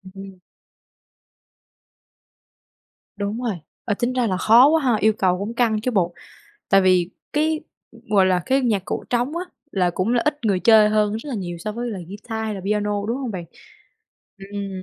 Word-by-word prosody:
Ừm. 195 -1 -10 2.8
Đúng 205 +3 -3
rồi, 230 -6 -1 0.3
ờ, 205 - 0
tính 240 +1 0
ra 250 -2 +1
là 185 -3 -1
khó 235 +7 +6
quá 320 0 +3
ha, 250 -4 +3
yêu 220 +1 +3
cầu 185 -4 +1
cũng 205 +4 -4
căng 225 -3 +1
chứ 255 - -1
bộ. 180 -6 +1 0.6
Tại 195 - +5
vì 185 -2 +3 0.2
cái, 310 +1 +1 0.5
gọi 200 -3 +4
là, 180 -1 +2
cái 270 +1 +2
nhạc 215 -7 0
cụ - - -4
trống 245 +6 0
á 355 - -2 0.3
là 180 -6 +1
cũng 185 +7 -1
là 240 - +2
ít 300 -1 0
người 195 -4 +1
chơi 220 -1 +6
hơn 210 -1 +2
rất 230 +7 -8
là 270 - -3
nhiều 175 -5 -5
so 215 +5 -4
với 240 +2 -4
là 205 - -5
ghi-ta 220 +3 -6
hay 215 -1 -3
là 195 - -6
piano, 205 0 -1
đúng 235 - -1
hông 265 -4 -4
bạn? 180 -4 -5 1.1
Ừm, 195 -2 -5
215 Hz, 190 wpm, -22 LUFS, 195-240 Hz, 2.8 s, khó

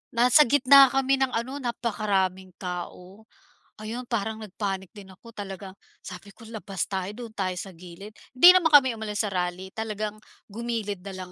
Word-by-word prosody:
Nasa 245 +5 +5
gitna 275 +1 +7
kami 270 +1 +1
ng 265 -1 +1
ano 255 +5 -3
napakaraming 200 -7 -2
tao. 180 +3 -8 0.5
Ayun, 225 +4 -6
parang 220 -2 -2
nag-panic 195 -3 -5
din 200 -2 -12
ako 230 +5 -16
talagang 195 -1 -8 0.3
sabi 185 +2 -10
ko, 235 - -16
"labas 205 -5 -5
tayo, 190 0 -4
doon 235 -1 -9
tayo 185 -2 -2
sa 195 - -8
gilid" 180 +4 -12 0.2
hindi 345 +8 +9
naman 340 -3 +4
kami 260 -5 +6
umalis 215 -1 -3
sa 210 - -2
rally 180 +1 -3
talagang 215 -1 -4 0.3
gumilid 220 -3 -4
na 195 - -8
lang 185 -1 -8
210 Hz, 165 wpm, -25 LUFS, 190-235 Hz, 0.5 s, hindi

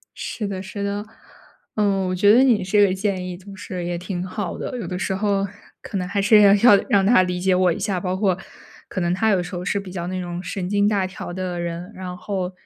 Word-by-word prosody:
是 210 -3 -4
的 190 -1 -4
是 200 +1 -6
的。 205 +1 -2 0.7
嗯， 200 -3 +1
我 - - -1
觉 205 +3 +5
得 250 +3 +6
你 230 -7 +3
这 205 +2 +4
个 185 - +1
建 190 -1 -2
议 180 -1 -5
就 195 +1 -12
是 185 -2 -6
也 175 0 -2
挺 180 0 -4
好 190 -1 -4
的。 255 - -5
有 235 - -5
的 180 0 -4
时 190 - -1
候 200 0 0 0.3
可 200 - -5
能 180 - -2
还 200 +1 0
是 210 +1 +6
要 200 -1 +7
要 205 +1 +7
让 195 -1 +4
他 205 -4 +5
理 180 0 -2
解 185 0 +2
我 185 -1 +3
一 170 - -3
下， 195 -2 -1
包 180 0 -2
括 190 -3 +1 0.5
可 - - -3
能 175 0 +1
他 220 +4 +1
有 190 -3 +3
时 175 +1 -6
候 175 - -4
是 200 +3 0
比 195 - -8
较 175 -2 -4
那 185 0 -3
种 175 0 -5
神 185 -2 -4
经 205 +1 +2
大 200 -3 +1
条 185 -1 -7
的 180 -1 -4
人。 170 +1 -5
然 185 -1 -6
后， 185 -2 -3
190 Hz, 270 characters per minute, -22 LUFS, 180-205 Hz, 0.7 s, 要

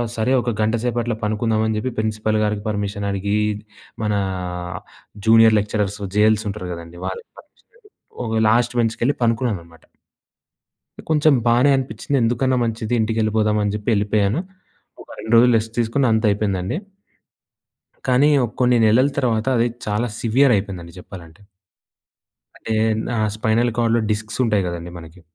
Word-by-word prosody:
సరే 115 +2 0
ఒక 120 - -2
గంటసేపట్ల 120 +2 0
పడుకుందాం 110 +1 0
అని 110 - -1
చెప్పి 125 +4 -2
ప్రిన్సిపల్ 110 0 -1
గారికి 105 -1 -1
పర్మిషన్ 100 -1 -3
అడిగి, 100 +2 -1 0.7
మన 105 -1 0 1.1
జూనియర్ 110 0 +6
లెక్చరర్స్ 105 0 -2 0.2
జెఎల్స్ 110 +1 +3
ఉంటారు 100 -3 -6
కదండీ! 85 +1 -10
వాళ్ళకి 95 - -7
పర్మిషన్ 300 - -23
అడిగి, 440 -3 -23 0.4
ఒక 110 -1 0
లాస్ట్ 120 +2 +2
బెంచ్‌కి 115 -1 -1
వెళ్లి 140 +4 +1
పండుకున్నానన్నమాట. 105 -9 -2 1.3
కొంచెం 155 -1 +4
బానే 125 +4 +4
అనిపించింది. 135 +1 -2
ఎందుకన్నా 125 +3 +1
మంచిది 115 0 -3
ఇంటికెళ్ళిపోదాం 110 -1 +1
అని, 105 - 0
చెప్పి 105 +2 -3
వెళ్ళిపోయాను. 105 +3 +1 0.6
ఒక - - -25
2 110 - -3
రోజులు 125 +1 +5
రెస్ట్ 110 +1 -7
తీసుకున్న. 120 +4 +1
అంత 110 +1 +1
అయిపోయిందండి. 100 - -1 1.3
కానీ, 130 +3 +4 0.3
కొన్ని 125 -1 +3
నెలల 120 +5 +4
తర్వాత 115 -5 0
అది 115 +1 +2 0.2
చాలా 105 +4 0
సివియర్ 125 +3 +3
అయిపోయిందండి 90 -4 -6
చెప్పాలంటే. 85 -1 -12 1.2
అంటే 110 - -4 0.4
ఆహ్, 110 -1 +1
స్పైనల్ 115 +2 +1
కార్డ్‌లో 115 -1 +2
డిస్క్స్ 110 +2 -4
ఉంటాయి 105 -4 +1
కదండీ 85 0 -6
మనకి. 80 +2 -14
110 Hz, 135 wpm, -20 LUFS, 105-120 Hz, 1.3 s, జూనియర్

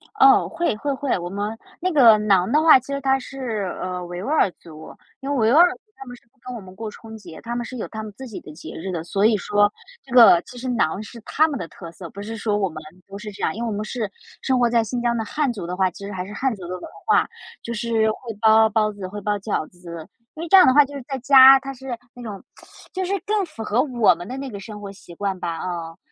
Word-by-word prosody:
哦， 400 0 +6
会 340 -9 -1
会 285 +5 -2
会， 275 -3 -1
我 175 0 -5
们 205 +3 -4 0.2
那 370 +1 -1
个 240 -9 +7
馕 200 -3 +2
的 300 - +4
话 315 -4 +7
其 255 +3 -11
实 280 - -2
它 270 0 +2
是， 235 -8 -4
呃， 180 -1 -4
维 175 +1 -6
吾 - - -5
尔 300 -8 +3
族。 160 -2 -13 0.2
因 275 0 -6
为 285 - 0
维 225 -2 +3
吾 - - +5
尔 350 +2 +8
族 - - -15 0.2
他 270 - -11
们 245 -1 -9
是 - - -21
不 270 - -38
跟 250 0 -7
我 230 - -7
们 185 -1 -13
过 220 +2 -6
春 220 +1 -12
节， 205 -6 -12
他 235 +1 -5
们 240 - -2
是 255 - -8
有 225 - -4
他 220 -1 -6
们 215 - -8
自 265 -1 -8
己 220 - -7
的 150 - -12
节 155 0 -10
日 190 +4 -5
的， 165 -3 -4
所 195 +4 0
以 220 -1 +4
说 205 +1 +2 0.3
这 255 - -11
个 225 -8 +8
其 250 - -13
实 255 +2 -6
馕 210 -6 0
是 230 +2 -11
他 310 +8 +2
们 285 -5 -4
的 - - -5
特 165 0 -11
色， 170 -1 -10
不 200 - -9
是 225 +2 -6
说 210 -1 0
我 195 -2 +1
们 155 -1 -9 0.3
都 195 0 -9
是 210 0 -8
这 200 0 -12
样。 - - +1
因 230 - -4
为 235 - -2
我 - - -3
们 210 - -3
是 220 -3 -3 0.3
生 260 -2 +1
活 240 -1 +3
在 230 -1 +2
新 240 +2 -3
疆 235 -1 +1
的 225 - -1
汉 285 +3 -1
族 195 -6 -6
的 180 - -4
话， 190 -1 +2
其 200 - -10
实 200 - -6
还 185 -2 -4
是 205 - -9
汉 260 +1 -1
族 190 - -12
的 - - -10
文 - - -14 0.2
化， 430 - +3 0.3
就 235 - -5
是 225 -1 +1
会 - - -7 0.2
包 220 0 +6
包 215 -1 +1
子， 200 -2 -7
会 205 +2 -7
包 205 +1 -1
饺 200 -6 -3
子。 170 -2 -10 0.3
因 315 - -6
为 340 - -5
这 - - +7
样 370 - +8
的 260 - +5
话 295 +1 +7
就 285 - -12
是 280 - -6
在 270 - -3
家 265 +1 +8
它 275 0 -7
是 260 -2 -6 0.2
那 245 - -12
种 210 -5 -8 0.5
就 375 - -2
是 370 - -3
更 420 -1 +1
符 225 -7 -8
合 225 +4 +1
我 245 -9 +3
们 175 +2 -9
的 255 - -6
那 270 -1 -6
个 200 - -7
生 210 +1 -9
活 200 -1 -7
习 190 -3 -14
惯 195 0 -3
吧， 165 -2 -4
嗯。 170 -2 -5
220 Hz, 310 characters per minute, -22 LUFS, 195-260 Hz, 0.5 s, 尔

